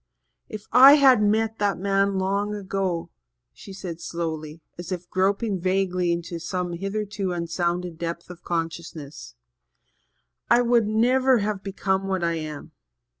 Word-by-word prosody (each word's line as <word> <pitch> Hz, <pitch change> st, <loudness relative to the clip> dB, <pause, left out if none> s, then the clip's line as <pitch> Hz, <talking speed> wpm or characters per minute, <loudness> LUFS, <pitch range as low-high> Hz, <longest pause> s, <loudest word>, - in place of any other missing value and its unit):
"If 215 Hz, 0 st, -8 dB
I 265 Hz, +3 st, +9 dB
had 265 Hz, -6 st, +6 dB
met 220 Hz, +1 st, +1 dB
that 205 Hz, -1 st, +1 dB
man 195 Hz, +1 st, +1 dB
long 200 Hz, +2 st, -1 dB
ago," 190 Hz, -4 st, -3 dB, 0.4 s
she 195 Hz, -, -12 dB
said 180 Hz, -3 st, -7 dB
slowly, 160 Hz, -2 st, -5 dB
as 175 Hz, +1 st, -8 dB
if 180 Hz, -1 st, -4 dB
groping 195 Hz, +2 st, 0 dB
vaguely 185 Hz, -1 st, 0 dB
in 170 Hz, 0 st, -1 dB
some 175 Hz, +1 st, -4 dB
hitherto 195 Hz, +1 st, -3 dB
unsounded 175 Hz, 0 st, -2 dB
depth 170 Hz, +1 st, -5 dB
of 175 Hz, -1 st, -12 dB
consciousness, 165 Hz, -, -5 dB, 1.1 s
"I 240 Hz, +1 st, +5 dB
would 235 Hz, -2 st, +3 dB
never 250 Hz, +4 st, +3 dB
have 210 Hz, -2 st, -2 dB
become 195 Hz, 0 st, -2 dB
what 190 Hz, -2 st, -1 dB
I 170 Hz, 0 st, +1 dB
am. 155 Hz, -2 st, -6 dB
190 Hz, 135 wpm, -24 LUFS, 170-205 Hz, 1.1 s, I